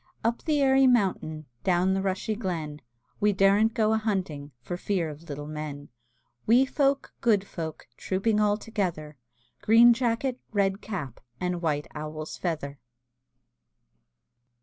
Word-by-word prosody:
Up 230 +1 0
the 300 -3 +2
airy 270 0 +5
mountain, 185 -10 +1 0.2
Down 185 0 +2
the 195 - 0
rushy 195 +3 -1
glen, 165 -8 -4 0.4
We 205 0 +3
daren't 200 +3 +3
go 220 -2 +2
a 220 - +2
hunting 180 -10 -3
For 120 +9 -5
fear 180 -2 -1
of 155 +3 -13
little 145 0 -5
men; 150 -1 -6 0.6
Wee 245 +4 +6
folk, 275 0 0
good 210 -4 +3
folk, 160 -5 -7
Trooping 210 +3 0
all 210 -1 +3
together; 180 -9 -3 0.5
Green 230 +3 +7
jacket, 245 +1 -1
red 200 -1 +1
cap, 165 - -5 0.2
And 180 -1 -2
white 150 -3 0
owl's 155 0 -6
feather! 150 -5 -4
195 Hz, 135 wpm, -27 LUFS, 155-220 Hz, 0.6 s, Green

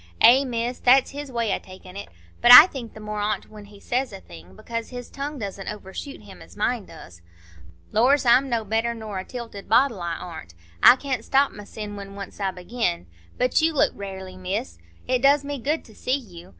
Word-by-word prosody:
"Eh, 260 +3 +7
Miss, 240 -1 -3
that's 260 +2 +4
his 285 -1 -7
way 230 -4 -1
o' - - -2
takin' 185 0 -14
it. 200 - -8 0.3
But 240 - +6
I 250 +6 +13
think 260 -10 -8
the - - -10
more 210 0 -5
on't 210 +1 -2
when 210 -1 -11
he 205 0 -16
says 250 +3 -2
a 195 - -9
thing, 90 - -15
because 230 - -6
his 245 -1 -9
tongue 285 +2 -5
doesn't 200 -4 -6
overshoot 210 +5 -8
him 195 -2 -14
as - - -15
mine 220 0 -1
does. 90 - -14 0.7
Lors! 255 +6 +3
I'm 250 +3 +4
no 230 -3 -1
better 225 +3 -1
nor 215 -4 -6
a - - -5
tilted 230 -3 -9
bottle, 235 -4 +3
I 170 -1 -3
ar'n't,—I 85 - +1
can't 260 -3 -4
stop 275 +3 +2
mysen 210 0 -8
when 200 0 -9
once 200 +1 -9
I 195 -1 0
begin. 180 - -3 0.3
But 250 +4 +2
you 325 0 +2
look - - +3
rarely, 190 -2 -8
Miss; 180 - -4 0.3
it 255 -1 +1
does 280 +1 +4
me 285 -1 -4
good 300 +6 -2
to 220 - -16
see 255 +5 -1
you. 180 -10 -13
220 Hz, 205 wpm, -24 LUFS, 195-255 Hz, 0.7 s, I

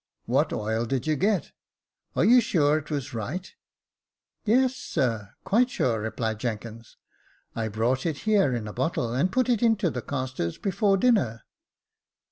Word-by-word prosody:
What - - +1
oil 110 +2 -1
did 130 0 -1
you 155 0 +1
get? 195 +1 0 0.3
— - - -49
are - - +3
you 245 +3 +7
sure 155 -7 +2
it 150 - -13
was 145 -2 -3
right? 145 - -5 0.3
" - - -66
" - - -54
Yes, 255 +4 +3
sir, 115 - -2
quite 245 +5 +3
sure," 115 - 0
replied 110 0 -3
Jenkins. 115 -1 -6 0.3
" - - -36
I 115 -1 -1
brought 115 +7 0
it 155 -3 -2
here 205 -9 +3
in 110 -3 -4
a 105 - -6
bottle, 125 -3 -1
and 170 +9 +1
put 255 +3 +2
it 240 -4 +2
into 220 -7 +2
the 125 - -4
castors 130 -12 -3
before 195 0 +1
dinner." 185 - +2
140 Hz, 175 wpm, -26 LUFS, -, 0.3 s, you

